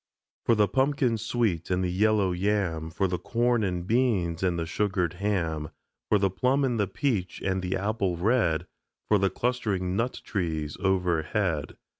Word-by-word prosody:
For 115 Hz, -, +4 dB
the 105 Hz, -1 st, +4 dB
pumpkin 130 Hz, -3 st, +1 dB
sweet 110 Hz, -6 st, -1 dB
and 90 Hz, 0 st, +1 dB
the 90 Hz, -, 0 dB
yellow 105 Hz, 0 st, +2 dB
yam, 90 Hz, -4 st, 0 dB
For 95 Hz, +4 st, 0 dB
the 90 Hz, -1 st, -2 dB
corn 120 Hz, +4 st, +1 dB
and 90 Hz, -3 st, -2 dB
beans 100 Hz, -7 st, +1 dB
and 90 Hz, -2 st, +1 dB
the 85 Hz, -, -1 dB
sugared 90 Hz, -1 st, 0 dB
ham, 85 Hz, -6 st, -1 dB, 0.4 s
For 105 Hz, -, +5 dB
the 100 Hz, -1 st, +1 dB
plum 130 Hz, +8 st, +1 dB
and 120 Hz, -3 st, 0 dB
the 100 Hz, -, +2 dB
peach 105 Hz, -, -1 dB
and 95 Hz, -1 st, 0 dB
the 90 Hz, +1 st, -1 dB
apple 100 Hz, -2 st, -1 dB
red, 100 Hz, -4 st, +2 dB, 0.4 s
For 105 Hz, -, +4 dB
the 95 Hz, 0 st, +2 dB
clustering 100 Hz, -5 st, -1 dB
nut 120 Hz, +4 st, -1 dB
trees 80 Hz, -6 st, -2 dB
overhead. 90 Hz, -2 st, 0 dB
95 Hz, 165 wpm, -27 LUFS, 90-110 Hz, 0.4 s, For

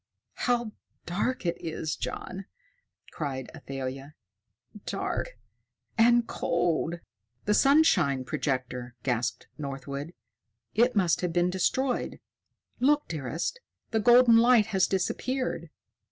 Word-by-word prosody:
"How 240 Hz, -2 st, +1 dB, 0.3 s
dark 205 Hz, +7 st, -1 dB
it 170 Hz, -, 0 dB
is, 160 Hz, -1 st, -3 dB
John!" 190 Hz, +1 st, -5 dB, 0.7 s
cried 135 Hz, -4 st, -4 dB
Athalia. 135 Hz, -1 st, -6 dB, 0.7 s
"Dark -, -, -3 dB, 0.6 s
and 235 Hz, +1 st, +5 dB
cold!" 170 Hz, -2 st, -1 dB, 0.4 s
"The 210 Hz, -, +3 dB
sunshine 205 Hz, -, +4 dB
projector!" 130 Hz, -4 st, -3 dB
gasped 125 Hz, -1 st, -1 dB
Northwood. 140 Hz, +3 st, -5 dB, 0.6 s
"It 240 Hz, +2 st, +3 dB
must 180 Hz, -5 st, +2 dB
have 180 Hz, -2 st, -1 dB
been 175 Hz, +1 st, +2 dB
destroyed. 245 Hz, +8 st, 0 dB, 0.6 s
Look, 295 Hz, +3 st, +3 dB
dearest! 160 Hz, -, -3 dB, 0.3 s
The 220 Hz, -, +2 dB
golden 240 Hz, +1 st, +7 dB
light 235 Hz, -2 st, +6 dB
has 190 Hz, -1 st, +4 dB
disappeared." 255 Hz, +7 st, -2 dB
175 Hz, 100 wpm, -28 LUFS, -, 0.7 s, golden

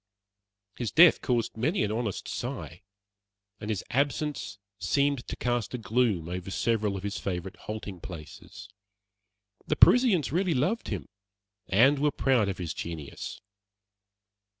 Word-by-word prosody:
His 120 Hz, -3 st, -2 dB
death 170 Hz, +1 st, +7 dB
caused 120 Hz, -3 st, 0 dB
many 145 Hz, -, +1 dB
an 105 Hz, -, -1 dB
honest 110 Hz, -3 st, -3 dB
sigh, 80 Hz, -, -5 dB, 0.8 s
and 105 Hz, -, -6 dB
his 105 Hz, -4 st, -1 dB
absence 145 Hz, -3 st, -1 dB, 0.2 s
seemed 140 Hz, -2 st, +1 dB
to -, -, -4 dB
cast 120 Hz, -1 st, -1 dB
a -, -, -2 dB
gloom 110 Hz, -6 st, +1 dB
over 90 Hz, +1 st, -5 dB
several 105 Hz, -1 st, 0 dB
of 95 Hz, -, -8 dB
his 100 Hz, 0 st, -3 dB
favorite 95 Hz, 0 st, -4 dB
halting 105 Hz, -4 st, -7 dB
places. 80 Hz, -5 st, -10 dB, 1.0 s
The -, -, +1 dB
Parisians 235 Hz, -, +5 dB
really 175 Hz, 0 st, +1 dB
loved 180 Hz, -, 0 dB
him, -, -, -4 dB, 0.6 s
and 130 Hz, +9 st, +5 dB
were 150 Hz, +1 st, +3 dB
proud 130 Hz, -7 st, +2 dB
of 95 Hz, -, -3 dB
his 85 Hz, -4 st, -4 dB
genius. 80 Hz, -4 st, -6 dB
115 Hz, 135 wpm, -28 LUFS, 95-140 Hz, 1.0 s, death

